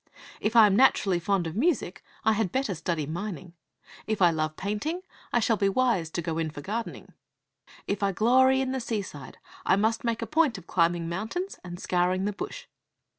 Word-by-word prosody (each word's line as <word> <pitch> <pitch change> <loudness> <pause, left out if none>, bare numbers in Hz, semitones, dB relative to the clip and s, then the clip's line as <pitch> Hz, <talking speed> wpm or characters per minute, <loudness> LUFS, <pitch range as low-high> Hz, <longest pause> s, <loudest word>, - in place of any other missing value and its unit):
If 215 +2 -1
I 225 -2 +9
am 200 -2 +3
naturally 200 -7 +4
fond 190 0 0
of 165 +1 -5
music, 250 - 0 0.2
I 220 - +5
had 210 -4 0
better 265 -6 0
study 165 -2 -2
mining. 175 +1 -6 0.5
If 220 -1 -1
I 175 -3 +6
love 155 -1 -2
painting, 210 - -3 0.3
I 240 - +3
shall 225 -1 +2
be 200 0 +2
wise 200 -7 +1
to 170 +1 -4
go 165 0 -2
in 160 -1 -1
for 150 - -9
gardening. 220 +8 -5 0.7
If 200 0 -2
I 200 -1 +2
glory 260 +6 +4
in 260 -1 -1
the 265 - -1
seaside, 200 - -5 0.3
I - - +4
must 220 +3 +1
make 235 -1 -1
a - - -2
point 305 -7 +2
of 185 - -12
climbing 170 -1 +1
mountains 220 - -4
and 175 -1 -8
scouring 185 +1 +1
the 205 - -1
bush. 485 - -6
200 Hz, 195 wpm, -27 LUFS, 175-235 Hz, 0.7 s, I